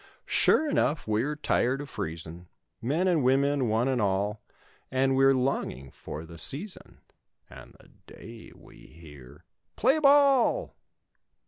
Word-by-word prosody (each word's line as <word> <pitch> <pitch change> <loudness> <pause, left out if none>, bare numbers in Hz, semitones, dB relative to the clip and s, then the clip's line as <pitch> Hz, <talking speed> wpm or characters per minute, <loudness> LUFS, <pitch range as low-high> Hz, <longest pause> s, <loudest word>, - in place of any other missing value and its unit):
Sure 315 - +3
enough 160 - 0
we're 110 +8 -1
tired 135 -3 0
of 145 - -7
freezin' 85 - -7 0.3
Men 155 +10 0
an 170 -4 +2
women—one 130 -3 +1
and 130 -3 0
all 100 +1 -1 0.5
And 135 0 +1
we're 135 0 +4
longing 95 - -3
for 80 +2 -9
the 85 0 -12
season 175 - -3 0.5
And - - -14
the - - -20 0.2
day 115 +1 -12
we - - -18
hear 75 -6 -15 0.3
"PLAY 265 +7 +2
BALL." 280 - +3
130 Hz, 125 wpm, -27 LUFS, 95-150 Hz, 0.5 s, we're